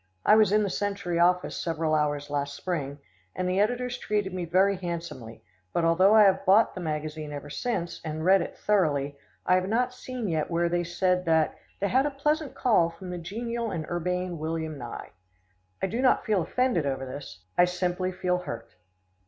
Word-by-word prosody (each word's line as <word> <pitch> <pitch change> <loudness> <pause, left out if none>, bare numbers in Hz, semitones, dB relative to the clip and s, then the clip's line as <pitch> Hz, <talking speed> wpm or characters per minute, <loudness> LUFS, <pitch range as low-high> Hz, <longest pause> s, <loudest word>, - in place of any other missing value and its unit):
I - - +7
was 215 -3 +5
in 210 0 +4
The 200 - 0
Century 200 -4 -2
office 180 +1 +3
several 165 -2 -1
hours 145 -1 0
last 145 0 -2
spring, 145 -6 -3 0.4
and 185 - -1
the 185 +1 +1
editors 245 +4 0
treated 205 -3 -1
me 180 -2 -3
very 190 +4 +3
handsomely, 170 -11 -6 0.3
but, 170 - +1
although 185 +5 +5
I 215 - +8
have 195 -2 +4
bought 200 +4 +5
the 185 - -6
magazine 155 -1 -4
ever 145 0 -7
since, 175 -2 -3
and 155 0 -4
read 190 +1 +6
it - - -6
thoroughly, 145 -9 +1 0.3
I - - +3
have 185 +1 +2
not 250 +3 +1
seen 250 -2 -5
yet 160 -4 -1
where 170 0 +1
they 175 0 0
said 180 +1 0
that 160 -2 +2 0.2
"they 200 - 0
had 265 +6 +3
a - - 0
pleasant 295 +1 -1
call 210 -9 +3
from 180 +2 -9
the 180 - -4
genial 230 +6 -3
and 165 -5 -3
urbane 180 0 -2
William 160 0 -3
Nye." 140 - -8 0.7
I - - +5
do 225 +6 -2
not 260 - +3
feel 210 -5 +2
offended 230 - 0
over 135 -1 -2
this. 130 -8 -9
I 175 - +6
simply 180 +1 -1
feel 180 -1 -1
hurt. 150 -10 -7
180 Hz, 195 wpm, -27 LUFS, 160-205 Hz, 0.7 s, I